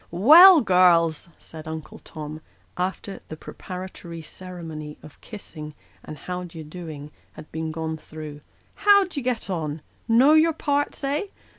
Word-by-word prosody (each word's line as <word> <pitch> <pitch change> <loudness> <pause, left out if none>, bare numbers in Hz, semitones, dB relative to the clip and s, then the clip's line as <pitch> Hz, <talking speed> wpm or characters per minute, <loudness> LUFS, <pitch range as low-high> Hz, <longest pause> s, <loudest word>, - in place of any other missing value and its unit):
" - - -35
Well, 315 - +8
girls! 175 -4 +3
" - - -33
said 160 -1 -10
Uncle 160 -1 -7
Tom, 155 0 -9 0.3
after 190 +2 -4
the 155 - -8
preparatory 180 -2 -9
ceremony 160 -4 -9
of 150 - -15
kissing 155 -8 -10 0.3
and 155 - -9
how 180 +5 -5
d'ye 165 -2 -9
do 165 +2 -9
ing 150 -1 -9 0.2
had 155 - -13
been 160 0 -4
gone 160 0 -4
through 155 -1 -10 0.2
" - - -37
how 400 -1 +8
d'ye 340 -6 -6
get 245 -2 -2
on? 160 -5 -4 0.2
Know 250 +6 +5
your 320 +1 +4
parts, 290 -1 -2
eh? 285 +7 -1
170 Hz, 160 wpm, -24 LUFS, 155-225 Hz, 0.3 s, Well